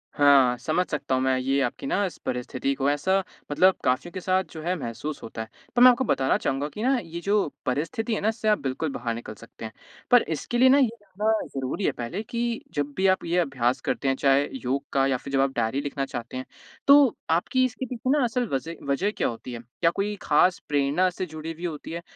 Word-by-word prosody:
हाँ, 135 -4 +5
समझ 175 +6 0
सकता 145 -3 -1
हूँ 130 - 0
मैं 130 0 +2
ये 135 +2 +1
आपकी 120 +1 -2
ना 205 - +1
इस 180 - -6
परिस्थिति 125 +2 -2
को, 135 +1 +1
ऐसा 190 +7 +1 0.3
मतलब 185 +6 +5
काफ़ियों 130 +7 0
के 190 - -4
साथ 185 +1 +1
जो 160 - -8
है 180 +3 0
महसूस 140 +6 -5
होता 110 0 -6
है। 110 - -7 0.3
पर 245 - +3
मैं 255 - +11
आपको 250 +2 0
बताना 135 -7 +2
चाहूँगा 135 +2 -1
कि 210 +9 -6
ना 265 +1 +3
ये 165 +1 -7
जो 200 0 +2 0.2
परिस्थिति 165 - -1
है - - -3
ना 210 - 0
इससे 220 -1 -3
आप 210 -1 +4
बिल्कुल 135 +3 -2
बाहर 120 -3 -3
निकल 115 -2 -7
सकते 115 +1 -11
हैं। 110 - -6 0.4
पर 245 - +8
इसके 165 - -3
लिए 260 +1 +6
ना 275 - +6
ये 265 -4 +5
जानना 205 +2 -1 0.2
ज़रूरी 135 +9 -2
है - - +3
पहले 125 - -5
कि 235 +1 -2
जब 145 -1 -2
भी 190 0 +3
आप 190 - +2
ये 170 +1 0
अभ्यास 130 -4 0
करते 135 - -1
हैं, 135 - +2
चाहे 140 +1 +3 0.2
योग 140 +2 -1
का 135 -1 +3
या 130 -2 +1
फ़िर 140 +2 -9
जब 135 - +3
आप 135 0 +1
डायरी 120 +4 0
लिखना 140 -1 -3
चाहते 120 0 -6
हैं 130 - -5 0.4
तो 280 -3 +7
आपकी 180 +11 +2
इसके 255 +1 -4
पीछे 250 +1 -4
ना 285 -1 +3
असल 245 +1 0
वज़ह 160 +5 -2
वजह 190 +10 +1
क्या - - +1
होती 120 +2 -6
है? 115 - -5 0.2
क्या 165 - +4
कोई 205 +3 -2
ख़ास 180 +5 +3
प्रेरणा 145 +6 +2
से 180 +1 -4
जुड़ी 160 -1 -7
हुई 170 +2 -7
होती 155 -2 -5
है? 170 +1 -4
155 Hz, 240 wpm, -25 LUFS, 135-200 Hz, 0.4 s, मैं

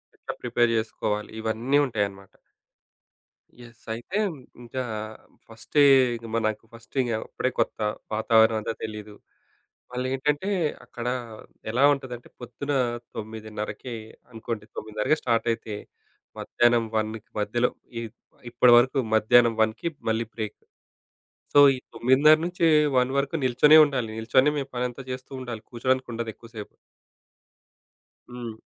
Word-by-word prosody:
ఎట్లా - - -7
ప్రిపేర్ 120 -1 +2
జేసుకోవాలి. 105 -1 -2
ఇవన్నీ 115 +5 0
ఉంటాయన్నమాట. 100 -5 -3 1.3
యెస్. 120 -1 -15
అయితే 120 - -5 0.5
ఇగ 120 +1 -14 0.7
ఫస్టే 115 +6 +1 0.3
ఇంగ 115 0 -9
మనకు 110 0 -1
ఫస్ట్ 115 +3 -16
ఇగ 120 - -2 0.2
అప్పుడే 130 - -2
కొత్త. - - 0 0.3
వాతావరణమంత 110 0 +3
తెలీదు. 105 -1 -7 0.8
మళ్ళేంటంటే 135 +8 -1 0.4
అక్కడ 120 0 -8 0.6
ఎలా 120 +5 +1
ఉంటదంటే, 125 -3 -7
పొద్దున 125 +3 -6 0.4
9:30కి 110 +2 -6 0.4
అనుకోండి, 115 -1 -5
9:30కి 110 +8 -1
స్టార్ట్ 115 -1 0
అయితే 110 -2 -7 0.6
మధ్యాహ్నం 120 -1 +2
1:00కి 110 0 -2
మధ్యలో, 120 +4 +1 0.3
ఇ - - -4 0.5
ఇప్పటి 120 0 +5
వరకు 130 +3 +3
మధ్యాహ్నం 115 +2 +5
1:00కి 110 +9 0 0.2
మళ్ళీ 110 +1 0
బ్రేక్. 110 -2 -4 1.0
సో, 145 - +9
ఈ - - -3 0.2
9:30-1:00 150 +1 +4
వరకు 140 +3 0
నిల్చొనే 130 +5 +6
ఉండాలి. 125 -6 -2
నిల్చొని 130 +5 +3
మేము 140 -2 -3
పనంతా 125 +1 -3
జేస్తుండాలి. 125 -3 -6
కూర్చోడానికి 130 +2 0
ఉండదు 115 0 -4
ఎక్కువ 115 - -15
సేపు. 105 - -6 1.6
హ్మ్. 120 -2 -6
120 Hz, 110 wpm, -25 LUFS, 110-130 Hz, 1.6 s, సో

